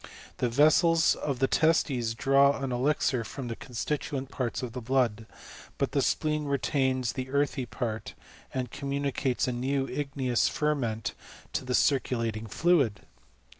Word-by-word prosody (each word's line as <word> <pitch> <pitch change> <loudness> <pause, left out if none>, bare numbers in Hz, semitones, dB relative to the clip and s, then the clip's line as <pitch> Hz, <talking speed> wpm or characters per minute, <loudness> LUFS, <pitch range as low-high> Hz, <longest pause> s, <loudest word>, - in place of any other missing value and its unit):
The 125 - 0
vessels 155 +5 +4
of 140 -3 -3
the 135 - +2
testes 130 -9 +2
draw 140 +3 +4
an 135 -1 -3
elixir 125 -1 +1
from 125 +2 -6
the 115 - -3
constituent 135 +3 -4
parts 125 -1 -3
of 120 -2 -5
the 125 - -5
blood; 115 -3 0 0.5
but - - 0
the - - +1
spleen 150 -1 0
retains 130 -3 0
the 130 0 -5
earthy 140 -2 0
part, 110 -3 -4 0.4
and 130 -2 -3
communicates 140 -2 -1
a - - 0
new 135 +3 -1
igneous 135 -4 0
ferment 130 -8 -1 0.4
to - - -1
the 125 -1 -1
circulating 115 -5 +1
fluid. 140 - +2
130 Hz, 140 wpm, -28 LUFS, 120-140 Hz, 0.5 s, vessels